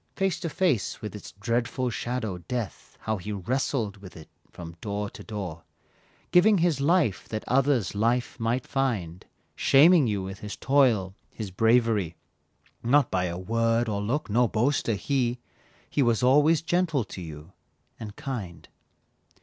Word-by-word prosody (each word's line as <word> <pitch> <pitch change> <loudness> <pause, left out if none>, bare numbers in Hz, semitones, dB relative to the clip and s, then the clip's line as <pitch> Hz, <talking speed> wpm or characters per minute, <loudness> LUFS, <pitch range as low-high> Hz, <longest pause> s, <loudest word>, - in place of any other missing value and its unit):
Face 195 -2 0
to 170 - -3
face 155 - 0
with 105 - -6
its 105 - -9
dreadful 120 +4 -1
shadow, 110 -6 -3
death, 110 +5 -6
How 110 -1 -1
he 105 +3 -6
wrestled 105 +1 -2
with 95 -3 -12
it 80 - -12 0.2
from 85 -1 -10
door 105 -1 -3
to - - -11
door, 95 -7 -6 0.7
Giving 200 +4 +6
his 165 -5 +1
life 150 - +1
that 110 -1 -4
others 130 -5 +2
life 115 +4 0
might 115 +3 -1
find, 105 -11 -2 0.3
Shaming 150 +1 +6
you 100 -3 -1
with 95 +1 -7
his 105 0 -6
toil, 120 -9 +2 0.2
his 105 -4 -6
bravery, 110 -4 +2 0.7
Not 135 +2 +3
by 90 -1 +1
a 85 -1 -3
word 115 +4 +1
or 100 -2 -2
look, 130 +9 -1
no 120 +3 +3
boaster 115 0 +1
he, 125 +2 0 0.5
He 145 - 0
was 120 -2 +2
always 150 +5 +4
gentle 170 -6 +1
to 95 - -9
you, 80 0 -9 0.5
and 105 -2 -8
kind. 110 -11 -6
115 Hz, 150 wpm, -26 LUFS, 100-135 Hz, 0.7 s, Giving